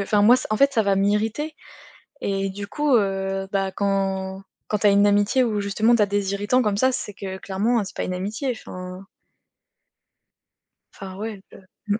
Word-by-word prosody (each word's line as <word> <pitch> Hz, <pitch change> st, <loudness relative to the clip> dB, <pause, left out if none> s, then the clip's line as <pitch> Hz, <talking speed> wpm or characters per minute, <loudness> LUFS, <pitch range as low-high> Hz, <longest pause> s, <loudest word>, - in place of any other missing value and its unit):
enfin, 205 Hz, +1 st, +2 dB
moi 230 Hz, +4 st, +7 dB
s 255 Hz, -, -4 dB
en 215 Hz, -, +1 dB
fait 275 Hz, +4 st, +4 dB
ça 230 Hz, -4 st, +2 dB
va 200 Hz, -1 st, +2 dB
m'irriter 215 Hz, +10 st, 0 dB, 0.7 s
et 195 Hz, 0 st, -1 dB
du 200 Hz, +1 st, -6 dB
coup, 295 Hz, +5 st, +1 dB
heu 195 Hz, -2 st, 0 dB
bah 195 Hz, -1 st, 0 dB
quand 195 Hz, -1 st, -1 dB, 0.2 s
quand 210 Hz, -, 0 dB
tu 205 Hz, -, +3 dB
as -, -, +7 dB
une 200 Hz, +1 st, +5 dB
amitié 205 Hz, +6 st, +3 dB
où 215 Hz, -4 st, 0 dB
justement 215 Hz, +4 st, +2 dB
tu 230 Hz, -, +2 dB
as -, -, +5 dB
des 200 Hz, -1 st, -1 dB
irritants 205 Hz, +6 st, +1 dB
comme 210 Hz, -4 st, 0 dB
ça, 260 Hz, +4 st, +3 dB
c'est 210 Hz, -4 st, -4 dB
que 190 Hz, -1 st, -6 dB
clairement, 210 Hz, +5 st, 0 dB
c'est -, -, -10 dB
pas -, -, -2 dB
une 185 Hz, -, -3 dB
amitié, 210 Hz, +9 st, -3 dB
enfin 185 Hz, -4 st, -8 dB, 1.9 s
Enfin 190 Hz, -2 st, -9 dB
ouais, 210 Hz, -1 st, -5 dB, 0.5 s
le 205 Hz, +1 st, 0 dB
205 Hz, 190 wpm, -23 LUFS, 195-220 Hz, 1.9 s, moi